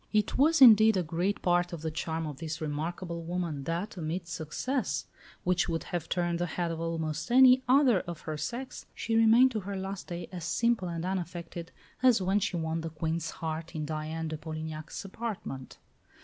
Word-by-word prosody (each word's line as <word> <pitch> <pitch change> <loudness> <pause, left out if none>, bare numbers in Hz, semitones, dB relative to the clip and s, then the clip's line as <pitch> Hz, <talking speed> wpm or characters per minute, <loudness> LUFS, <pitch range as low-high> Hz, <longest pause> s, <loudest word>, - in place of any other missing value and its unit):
It 210 -1 +1
was, 305 +1 +5
indeed, 220 -3 +8
a 180 - +1
great 175 +5 -1
part 175 0 +2
of 165 -2 -6
the 160 - -2
charm 160 +1 -3
of 150 -3 -6
this 160 +1 -5
remarkable 170 +3 -3
woman 165 -4 -3
that, 175 +6 -3
amid 170 +1 -3
success 175 - -2 0.4
which 180 -1 +1
would 165 -1 -1
have 175 -2 -4
turned 175 -1 0
the 175 - 0
head 170 0 -2
of 165 0 -4
almost 165 +2 -2
any 255 +1 +7
other 255 -6 +5
of 175 -3 -7
her 155 - -4
sex, 240 - -5
she 225 - -2
remained 225 +3 +6
to 220 - -2
her 200 0 -5
last 190 0 -5
day 175 -1 -5
as 180 -3 -6
simple 230 +2 +1
and 170 0 -3
unaffected 175 -2 -4 0.3
as 250 -4 +5
when 190 +2 +2
she 180 - -1
won 160 0 -2
the 165 - -4
Queen's 160 +1 -2
heart 160 +1 -5
in 155 -1 -2
Diane 155 +1 -3
de 155 0 -4
Polignac's 155 +2 -6
apartment. 195 - -6
170 Hz, 190 wpm, -30 LUFS, 160-200 Hz, 0.4 s, indeed